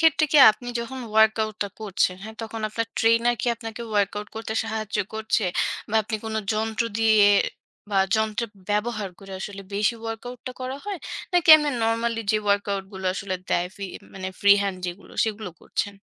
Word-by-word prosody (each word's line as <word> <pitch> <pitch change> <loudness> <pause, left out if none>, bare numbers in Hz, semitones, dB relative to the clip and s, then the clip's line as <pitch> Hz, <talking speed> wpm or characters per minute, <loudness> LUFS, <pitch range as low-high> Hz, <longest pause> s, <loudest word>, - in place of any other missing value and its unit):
ক্ষেত্রে 320 -1 +4
কি 300 - +7
আপনি 245 +3 -8
যখন 260 +3 -6
ওয়ার্কআউট 220 0 +3
টা 205 - -4
করছেন, 200 -3 +1
হ্যাঁ 220 +1 -8
তখন 225 0 -6
আপনার 230 +1 -2
trainer 230 +1 +4
কি - - -3
আপনাকে 225 0 -7
ওয়ার্কআউট 205 0 0
করতে 225 0 -4
সাহায্য 220 -1 -3 0.2
করছে? 220 0 0 0.4
বা 215 - -5
আপনি 220 +1 -3
কোন 220 0 -4 0.2
যন্ত্র 220 +1 -1
দিয়ে 220 -2 +6 0.6
বা 195 - +2 0.2
যন্ত্র 220 +1 0 0.3
ব্যবহার 210 0 -1
করে 195 -1 -11
আসলে 200 0 -6
বেশি 210 +4 +2
ওয়ার্কআউট 230 +2 -6
টা 255 - -3
করা 255 +1 -4
হয়? 405 -3 -4 0.3
নাকি 355 -2 +2
এমনে 295 -1 0
normally 230 0 0
যে - - +3
ওয়ার্কআউট 200 -1 0
গুলো 190 -1 -5
আসলে 190 -1 -3 0.2
দেয় 175 +1 +1
ফি 200 - -5 0.3
মানে 185 -1 -4
free 200 0 +7
hand 195 -2 -2
যেগুলো 175 +3 -8
সেগুলো 215 -3 -4
করছেন? 205 - -3
220 Hz, 175 wpm, -24 LUFS, 205-230 Hz, 0.6 s, কি